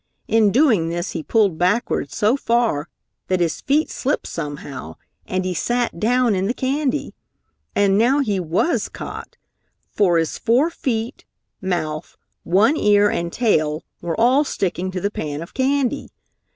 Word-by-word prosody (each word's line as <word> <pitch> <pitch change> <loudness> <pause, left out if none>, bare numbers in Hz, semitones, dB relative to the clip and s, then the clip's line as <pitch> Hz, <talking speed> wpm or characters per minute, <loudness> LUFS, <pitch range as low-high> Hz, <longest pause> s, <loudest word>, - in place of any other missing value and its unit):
In 220 -1 +4
doing 225 - +3
this 175 +2 -3
he 165 - -4
pulled 200 -2 +1
backwards 180 - 0
so 215 +3 +3
far 230 - 0 0.4
that 185 -1 +1
his 170 -2 -1
feet 300 +4 +1
slipped 275 +3 -1
somehow, 145 - -6 0.3
and 185 0 -1
he 185 - -1
sat 240 +1 -1
down 245 +2 +2
in 190 0 0
the 240 - -1
candy. 275 +2 -1 0.6
And 200 0 +3
now 250 +5 +4
he 215 -9 0
was 180 - 0
caught! - - -8 0.5
For 180 -5 +3
his 165 -1 -1
four 265 +9 +2
feet, 235 -7 -3 0.4
mouth, 170 -4 -3 0.2
one 205 - +3
ear 205 -3 +4
and 170 0 -2
tail 155 -10 +1 0.2
were 170 +1 -3
all 255 +5 +4
sticking 185 - -2
to 185 0 -4
the 200 - -1
pan 150 -4 -4
of 170 - -13
candy. 265 -1 0
205 Hz, 150 wpm, -21 LUFS, 170-245 Hz, 0.6 s, In